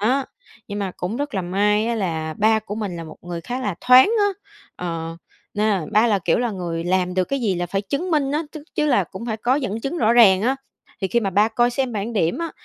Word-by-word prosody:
Đó, 260 Hz, +6 st, +2 dB, 0.4 s
nhưng 205 Hz, 0 st, -4 dB
mà 195 Hz, -3 st, -3 dB
cũng 180 Hz, +6 st, -3 dB
rất 290 Hz, -3 st, -3 dB
là 190 Hz, -, 0 dB
may 210 Hz, +4 st, +1 dB
á 235 Hz, -, 0 dB
là 160 Hz, -7 st, -2 dB
ba 220 Hz, +1 st, +4 dB
của 210 Hz, -1 st, -6 dB
mình 205 Hz, -5 st, -4 dB
là 165 Hz, -, -6 dB
một 155 Hz, -, -11 dB
người 175 Hz, -1 st, -5 dB
khá 245 Hz, +8 st, -4 dB
là 205 Hz, -7 st, -2 dB
thoáng 255 Hz, +9 st, +7 dB
á, 410 Hz, -, +4 dB, 0.5 s
ờ, 165 Hz, -2 st, -4 dB, 0.4 s
nên 210 Hz, +1 st, +1 dB
là 185 Hz, -6 st, 0 dB
ba 215 Hz, +3 st, +5 dB
là, 210 Hz, -3 st, +2 dB
kiểu 170 Hz, -2 st, +1 dB
là, 240 Hz, -1 st, 0 dB
người 170 Hz, -4 st, -4 dB
làm 180 Hz, 0 st, 0 dB
được 185 Hz, 0 st, +2 dB
cái 275 Hz, +7 st, -2 dB
gì 210 Hz, -6 st, +1 dB
là 175 Hz, 0 st, -2 dB
phải 195 Hz, +3 st, -2 dB
chứng 280 Hz, -, -3 dB
minh 285 Hz, -4 st, +1 dB
á, 305 Hz, +2 st, 0 dB
chức 310 Hz, -, -8 dB
chứ 300 Hz, -, +1 dB
là 245 Hz, -10 st, +3 dB
cũng 190 Hz, +7 st, -9 dB
phải 220 Hz, -2 st, -2 dB
có 240 Hz, +4 st, +1 dB
dẫn 240 Hz, -6 st, -2 dB
chứng 275 Hz, +8 st, -3 dB
rõ 225 Hz, -2 st, +3 dB
ràng 205 Hz, -5 st, +6 dB
á. 260 Hz, +3 st, +1 dB, 0.4 s
Thì 190 Hz, -, -1 dB
khi 235 Hz, +5 st, +2 dB
mà 195 Hz, -, -1 dB
ba 205 Hz, +4 st, +3 dB
coi 240 Hz, +2 st, +2 dB
xem 255 Hz, -1 st, -1 dB
bảng 215 Hz, +2 st, -3 dB
điểm 175 Hz, -, 0 dB
á, 335 Hz, -1 st, -3 dB
210 Hz, 265 wpm, -22 LUFS, 185-245 Hz, 0.5 s, thoáng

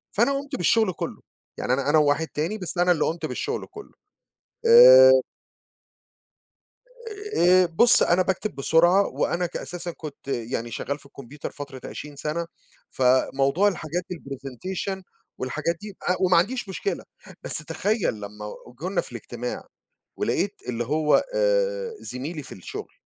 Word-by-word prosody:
فأنا 275 Hz, -, +3 dB
قُمت 275 Hz, 0 st, -4 dB
بالشغل 185 Hz, +3 st, +2 dB
كله، -, -, -6 dB, 0.4 s
يعني 125 Hz, -, 0 dB
أنا 140 Hz, +2 st, 0 dB
أنا 155 Hz, -, +5 dB
وواحد 150 Hz, +2 st, +2 dB
تاني 165 Hz, +9 st, -3 dB
بس 180 Hz, -2 st, -5 dB
أنا 180 Hz, 0 st, +4 dB
اللي 155 Hz, -3 st, +2 dB
قُمت 165 Hz, +2 st, -2 dB
بالشغل -, -, -3 dB
كُلّه. 425 Hz, -1 st, -11 dB, 0.7 s
آآ -, -, +9 dB, 2.2 s
آآ 180 Hz, +1 st, +6 dB
بُص 175 Hz, +8 st, +5 dB
أنا 175 Hz, +2 st, +3 dB
باكتب 190 Hz, -1 st, -2 dB
بسرعة 175 Hz, +7 st, +4 dB
وأنا 175 Hz, +1 st, -1 dB
ك -, -, -5 dB
أساسًا 175 Hz, -1 st, -5 dB
كنت 150 Hz, -4 st, -10 dB
يعني 120 Hz, -2 st, -3 dB
شغّال 140 Hz, +5 st, -4 dB
في -, -, -15 dB
الكمبيوتر 140 Hz, +1 st, -9 dB
فترة 140 Hz, -3 st, -9 dB
20 150 Hz, -1 st, -8 dB
سنة، 160 Hz, +4 st, -3 dB, 0.4 s
فموضوع 135 Hz, +7 st, +2 dB
الحاجات 175 Hz, -2 st, -2 dB
الpresentation 155 Hz, -, -6 dB, 0.4 s
والحاجات 155 Hz, +6 st, -2 dB
دي 205 Hz, -2 st, -9 dB
أ 180 Hz, -, +1 dB
وما 180 Hz, -2 st, +4 dB
عنديش 210 Hz, +4 st, 0 dB
مشكلة، 400 Hz, -, -3 dB, 0.4 s
بس -, -, +1 dB
تخيّل 210 Hz, -, -1 dB
لمّا 105 Hz, +1 st, -7 dB, 0.3 s
جولنا 185 Hz, +2 st, 0 dB
في -, -, -9 dB
الاجتماع، 120 Hz, +1 st, -6 dB, 0.5 s
ولقيت 200 Hz, +1 st, -1 dB
اللي 120 Hz, -1 st, -2 dB
هو 150 Hz, +3 st, +2 dB
آآ -, -, +1 dB
زميلي 145 Hz, +5 st, -5 dB
في 130 Hz, -, -9 dB
الشغل، 90 Hz, -, -8 dB
170 Hz, 140 wpm, -24 LUFS, 140-200 Hz, 2.2 s, آآ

